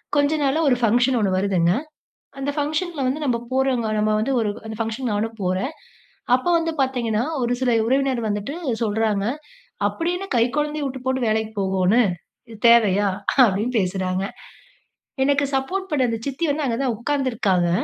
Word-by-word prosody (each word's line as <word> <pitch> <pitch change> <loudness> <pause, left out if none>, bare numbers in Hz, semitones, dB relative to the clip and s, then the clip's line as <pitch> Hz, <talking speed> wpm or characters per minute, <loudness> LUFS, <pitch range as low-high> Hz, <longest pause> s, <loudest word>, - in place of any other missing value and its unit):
கொஞ்சம் 290 +1 +2
நாள்ல 280 +4 +1
ஒரு 255 - +4
ஃபங்க்ஷன் 245 +3 +3
ஒண்ணு 200 -3 +1
வருதுங்க. 185 -3 +2 0.7
அந்த 275 +1 -2
ஃபங்ஷன்ல 310 +2 -1
வந்து 280 +4 -1
நம்ம 245 -4 +1
போறோங்க. 260 -3 +1
நம்ம 215 0 +2
வந்து 230 +6 0
ஒரு 215 -2 0 0.2
அந்த 220 - -6
ஃபங்ஷன் 225 +2 -2
நானும் 225 +2 -2
போறேன். 185 - -1 0.6
அப்போ 255 +7 -1
வந்து 330 0 -1
பாத்தீங்கன்னா, 235 -4 0 0.2
ஒரு 245 0 +1
சில 250 -2 +2 0.2
உறவினர் 265 -2 +1
வந்துட்டு 205 +8 -3 0.3
சொல்றாங்க, 210 -2 0 0.6
"அப்புடி 335 +1 -2
என்ன 390 +1 -6
கைகொழந்தையை 295 +5 0
விட்டுபோட்டு 260 -1 -2
வேலைக்கு 220 0 0
போகோணு? 190 +4 +3 0.5
இது 225 - -10
தேவையா?" 205 -4 +4 0.4
அப்டீன்னு 215 +5 -1
பேசுறாங்க. 185 0 -1 1.0
எனக்கு 285 +1 +2
சப்போர்ட் 375 +9 -2
பண்ண 270 -4 +2
அந்த 230 - -2
சித்தி 275 +5 -2
வந்து, 295 0 -1
அங்க 230 -1 -1
தான் 245 -4 0
உட்காந்துருக்காங்க. 230 -9 0
245 Hz, 150 wpm, -22 LUFS, 215-275 Hz, 1.0 s, ஒரு